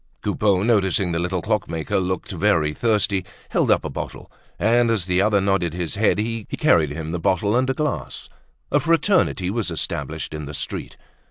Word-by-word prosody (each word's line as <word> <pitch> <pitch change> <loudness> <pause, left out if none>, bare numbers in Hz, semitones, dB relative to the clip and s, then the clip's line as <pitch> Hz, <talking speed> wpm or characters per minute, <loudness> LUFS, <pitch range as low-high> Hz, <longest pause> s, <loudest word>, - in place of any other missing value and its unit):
Coupeau, 100 -3 +1
noticing 95 -5 +2
the 85 - -1
little 90 0 -2
clockmaker 85 -6 -1
looked 95 +1 -2
very 85 -5 +2
thirsty, 105 -2 +1 0.3
held - - +1
up - - +3
a - - -2
bottle; - - -7 0.3
and 120 +2 +3
as 110 -6 +1
the 90 0 +2
other 105 0 +3
nodded 95 -4 0
his 90 -3 -3
head, 105 0 +2
he 115 +1 -2
carried 80 -4 +4
him 80 +2 -5
the 90 - -2
bottle 100 +4 +1
and 130 +1 +2
a 130 - 0
glass. 150 +1 -3 0.4
A 145 - +4
fraternity 165 - +2
was 110 -3 -1
established 80 -1 -4
in 75 -1 -5
the 75 +1 -7
street. - - -5
95 Hz, 180 wpm, -22 LUFS, 85-110 Hz, 0.4 s, carried